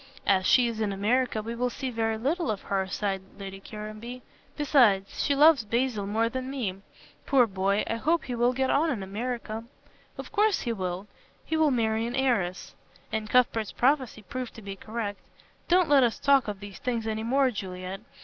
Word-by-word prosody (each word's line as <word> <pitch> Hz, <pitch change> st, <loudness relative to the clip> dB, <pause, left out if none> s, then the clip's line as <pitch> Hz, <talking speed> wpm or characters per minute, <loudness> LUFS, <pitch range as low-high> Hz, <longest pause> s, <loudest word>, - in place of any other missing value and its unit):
"As 190 Hz, -2 st, +3 dB
she 250 Hz, -2 st, +5 dB
is 225 Hz, -1 st, -3 dB
in 210 Hz, -2 st, 0 dB
America 220 Hz, +3 st, +1 dB
we 230 Hz, +2 st, -4 dB
will 245 Hz, +1 st, 0 dB
see 260 Hz, +1 st, -4 dB
very 225 Hz, -1 st, 0 dB
little 315 Hz, +9 st, -1 dB
of 210 Hz, -3 st, -2 dB
her," 195 Hz, -1 st, -1 dB
sighed 195 Hz, 0 st, -2 dB, 0.2 s
Lady 195 Hz, -1 st, -7 dB
Caranby, 215 Hz, +5 st, -8 dB, 0.3 s
"besides, 240 Hz, -10 st, +3 dB
she 285 Hz, -, +2 dB
loves 295 Hz, -3 st, +6 dB
Basil 230 Hz, -2 st, -1 dB
more 225 Hz, +3 st, +1 dB
than 255 Hz, +2 st, -4 dB
me. 235 Hz, -9 st, -3 dB, 0.5 s
Poor 265 Hz, -3 st, +5 dB
boy, 200 Hz, 0 st, 0 dB
I 230 Hz, -, -2 dB
hope 325 Hz, +8 st, +1 dB
he 250 Hz, -, -5 dB
will 240 Hz, +1 st, +2 dB
get 265 Hz, +1 st, 0 dB
on 315 Hz, +4 st, +3 dB
in 230 Hz, -9 st, -2 dB
America." 225 Hz, +2 st, -4 dB, 0.5 s
"Of -, -, -8 dB
course 425 Hz, 0 st, +2 dB
he 235 Hz, -, -1 dB
will. 185 Hz, -1 st, -4 dB, 0.4 s
He 320 Hz, -, -1 dB
will 315 Hz, -1 st, +4 dB
marry 225 Hz, -3 st, +1 dB
an 240 Hz, -, -4 dB
heiress 225 Hz, -10 st, 0 dB, 0.2 s
" 180 Hz, -, -28 dB
And 215 Hz, -1 st, -2 dB
Cuthbert's 230 Hz, -3 st, +2 dB
prophecy 260 Hz, -4 st, +1 dB
proved 250 Hz, +5 st, -6 dB
to 225 Hz, -, -11 dB
be 195 Hz, 0 st, -6 dB
correct 215 Hz, 0 st, -5 dB, 0.5 s
"Don't 360 Hz, -1 st, +4 dB
let 285 Hz, -2 st, +6 dB
us 240 Hz, -3 st, +2 dB
talk 275 Hz, -3 st, +3 dB
of 205 Hz, -2 st, -5 dB
these 200 Hz, -1 st, -9 dB
things 235 Hz, -3 st, -2 dB
any 220 Hz, 0 st, -2 dB
more, 260 Hz, +3 st, +2 dB
Juliet. 185 Hz, -2 st, -6 dB
230 Hz, 195 wpm, -27 LUFS, 205-260 Hz, 0.5 s, loves